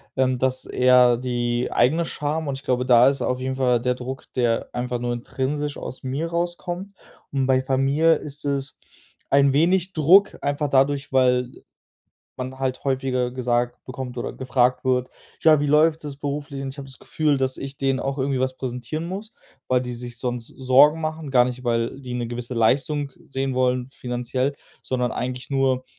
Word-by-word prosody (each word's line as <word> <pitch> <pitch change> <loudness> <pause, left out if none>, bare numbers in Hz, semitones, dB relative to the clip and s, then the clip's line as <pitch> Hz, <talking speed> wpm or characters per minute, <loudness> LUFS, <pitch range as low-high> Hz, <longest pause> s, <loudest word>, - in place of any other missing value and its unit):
ähm, 130 -1 +1
das 130 0 +1
ist - - -9
eher 125 -1 +5
die 120 -1 -1
eigene 155 +8 +2
Scham 150 0 -3
und 135 - -2
ich 135 - -12
glaube, 125 -2 0
da 125 0 +6
ist 140 - -2
auf 125 0 -1
jeden 130 0 -2
Fall 125 -3 +2
der 125 0 0
Druck, 130 +1 -7
der 120 -2 +1
einfach 125 0 -3
nur 120 0 -2
intrinsisch 140 +4 -3
aus 130 - -8
mir 135 +5 -2
rauskommt. 175 +3 -3 0.4
Und 135 -1 +1
bei 130 0 +3
Familie 135 +5 +3
ist 150 -1 -9
es 140 -1 -2 0.5
ein 140 0 +4
wenig 175 +6 +2
Druck, 180 +6 +5
einfach 145 +1 -1
dadurch, 140 +1 +2
weil 125 -1 +3 0.9
man 130 +1 -6
halt 130 -1 -2
häufiger 130 -2 0
gesagt 120 -1 -1
bekommt 130 -1 -7
oder 120 - -4
gefragt 130 -1 +1
wird: 125 -1 +1 0.3
„Ja, 155 -1 +6
wie 145 - 0
läuft 155 +2 +3
es 145 - -5
beruflich?“ 145 -1 -4
Und 135 - -4
ich 135 - -8
habe 140 - -7
das 130 - -9
Gefühl, 150 -3 0
dass 130 -1 0
ich 135 0 -7
denen 135 -1 +1
auch 135 +1 -2
irgendwie 135 0 0
was 130 0 -1
präsentieren 130 +5 -4
muss, 205 +4 -6 0.3
weil 125 -1 +2
die 125 -1 -4
sich 120 0 -7
sonst 125 -2 -3
Sorgen 135 +6 +4
machen, 155 -2 -4
gar 125 -2 +6
nicht, 125 +1 -5
weil 115 +2 -1
die 125 -2 -6
'ne 120 -1 -3
gewisse 120 +1 -4
Leistung 140 +5 +1
sehen 135 -1 -3
wollen, 125 0 +1
finanziell, 125 +1 -2 0.3
sondern 125 -2 -1
eigentlich 125 +1 -4
nur, 135 -2 +1
130 Hz, 185 wpm, -23 LUFS, 125-145 Hz, 0.9 s, da